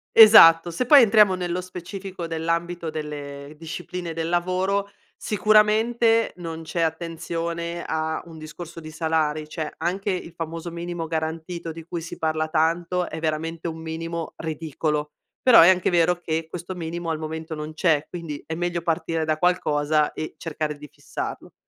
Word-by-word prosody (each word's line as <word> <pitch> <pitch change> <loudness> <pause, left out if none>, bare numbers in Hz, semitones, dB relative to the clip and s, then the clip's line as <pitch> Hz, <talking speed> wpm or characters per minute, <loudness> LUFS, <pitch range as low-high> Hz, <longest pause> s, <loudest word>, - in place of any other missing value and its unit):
Esatto, 175 -7 +9
se 170 +9 -2
poi 285 +2 +9
entriamo 210 -3 +6
nello 180 -1 -2
specifico 185 0 -7
dell'ambito 165 +1 -2
delle 145 -1 -7
discipline 170 +1 -6
del 165 0 -3
lavoro, 185 +3 0 0.3
sicuramente, 220 +3 +3
non 165 -2 -6
c'è 165 +1 -3
attenzione 170 +1 -3
a 160 0 -2
un 165 -2 -12
discorso 160 +2 -9
di 155 -1 -9
salari, 155 -1 -1
cioè, 155 -1 -4
anche 185 +5 -1
il 180 -2 -4
famoso 165 +1 -5
minimo 170 0 -5
garantito, 160 +1 -4
di 165 0 -9
cui 170 +1 -5
si 165 - -8
parla 155 0 0
tanto, 170 +3 0
è 160 - -6
veramente 160 +1 -2
un 160 0 -5
minimo 165 +1 -5
ridicolo. 155 -1 -3 0.3
Però, 250 -3 +8
è 170 - +8
anche 185 -1 +3
vero 175 0 +3
che 165 -1 -2
questo 180 +3 -6
minimo 170 0 -4
al 160 - -1
momento 160 +1 -5
non 150 0 -6
c'è, 155 -2 +2
quindi, 165 -5 -6
è 160 - -5
meglio 175 0 -2
partire 165 -1 -1
da 155 0 0
qualcosa 155 -4 +2
e, 155 - -6
cercare 155 -2 -4
di 150 - -11
fissarlo. - - -6
165 Hz, 160 wpm, -24 LUFS, 160-175 Hz, 0.3 s, Esatto